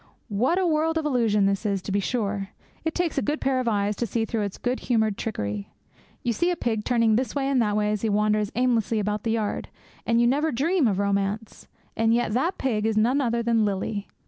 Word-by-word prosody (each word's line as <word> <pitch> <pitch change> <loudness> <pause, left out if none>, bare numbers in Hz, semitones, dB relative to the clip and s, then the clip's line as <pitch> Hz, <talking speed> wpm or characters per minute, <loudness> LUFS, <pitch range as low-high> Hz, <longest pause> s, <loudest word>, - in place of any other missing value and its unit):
What 240 - +1
a 380 - +2
world 325 0 +1
of 320 - -1
illusion 230 -8 +2
this 195 +1 0
is, 200 -2 0
to 195 - -5
be 200 - +2
sure! 200 -3 -2 0.3
It 320 -1 -2
takes 340 -5 0
a - - -1
good 295 +3 -1
pair 265 -1 +1
of 255 - -2
eyes 205 -1 +1
to 235 - -1
see 225 -1 -1
through 225 -1 -2
its 200 -2 -3
good 250 +1 -2
humoured 220 -4 +1
trickery. 105 - -4 0.5
You 235 - +1
see 345 +9 +1
a 355 - +1
pig 225 -8 -1
turning 230 -3 +3
this 255 +3 -2
way 275 -1 0
and 270 -3 +2
that 210 -2 +1
way 210 0 +1
as 210 -2 -2
he 225 - 0
wanders 210 0 +1
aimlessly 235 -3 +1
about 210 0 -1
the 225 - -3
yard, 215 -2 -2 0.3
and 230 0 +2
you 240 - +4
never 290 +6 +2
dream 300 +4 +2
of 200 -4 0
romance. 200 +2 -2 0.3
And 225 +1 +3
yet 240 -2 0
that 320 +10 0
pig 220 -5 0
is 220 -1 0
none 245 +6 +3
other 235 -2 0
than 230 -1 +2
Lily! 205 0 -2
225 Hz, 235 wpm, -25 LUFS, 210-255 Hz, 0.5 s, you